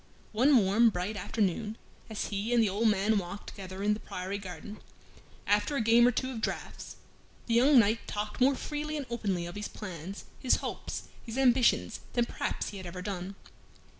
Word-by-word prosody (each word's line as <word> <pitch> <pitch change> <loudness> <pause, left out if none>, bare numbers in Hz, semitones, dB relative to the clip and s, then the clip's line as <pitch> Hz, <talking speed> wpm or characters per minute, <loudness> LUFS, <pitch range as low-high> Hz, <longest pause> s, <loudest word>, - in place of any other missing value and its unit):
One 260 +5 +5
warm 215 +3 +5
bright 190 +2 -3
afternoon, 210 +2 -1 0.3
as 220 - -3
he 210 +4 -1
and 235 - +5
the 210 - +2
old 210 +4 +1
man 210 +1 +3
walked 185 +2 -7
together 190 0 -7
in 210 +1 +3
the 210 - -4
priory 190 +1 -5
garden, 200 +3 -8 0.7
after 210 +8 +2
a - - +1
game 230 +2 +6
or - - +4
two 260 +2 -2
of 230 -3 -5
draughts, - - -4 0.5
the 230 - -1
young 260 +4 +6
knight 225 0 +3
talked 210 +3 -4
more 270 +2 +5
freely 300 +2 -3
and 285 - -4
openly 195 -7 -1
of 175 - -6
his 210 +2 -4
plans, 185 -1 -7
his 255 - +3
hopes, - - -4 0.2
his 230 +1 -6
ambitions, 255 -2 +3
than 240 -1 +2
perhaps - - -3
he 205 - -8
had 185 -2 -7
ever 180 +1 -6
done. 190 0 -4
210 Hz, 190 wpm, -30 LUFS, 195-235 Hz, 0.7 s, game